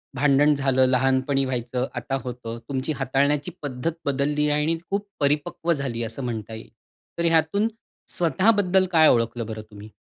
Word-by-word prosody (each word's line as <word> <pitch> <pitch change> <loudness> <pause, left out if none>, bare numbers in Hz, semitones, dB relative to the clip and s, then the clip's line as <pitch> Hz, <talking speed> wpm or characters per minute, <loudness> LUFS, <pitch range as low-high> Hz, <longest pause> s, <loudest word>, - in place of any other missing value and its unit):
भांडण 145 +2 +4
झालं, 135 -2 +2
लहानपणी 130 +2 +2
व्हायचं, 125 0 -2
आता 125 +3 -3
होतं, 120 -2 -6
तुमची 135 +2 -2
हाताळण्याची 140 +4 0
पद्धत 140 +2 -2
बदलली 145 +2 +1
आहे 150 0 +2
आणि 165 +2 +1
खूप 200 +1 -2
परिपक्व 150 +3 0
झाली, 130 -6 -3
असं 115 +4 -5
म्हणता 115 -3 -4
येईल. 110 - -9 0.5
तर 170 - +1
यातून, 165 +6 +2 0.5
स्वतःबद्दल 190 +1 +3
काय 160 -2 +6
ओळखलं 115 0 +1
बरं 110 -1 -6
तुम्ही? 105 +1 -11
135 Hz, 150 wpm, -24 LUFS, 125-155 Hz, 0.5 s, काय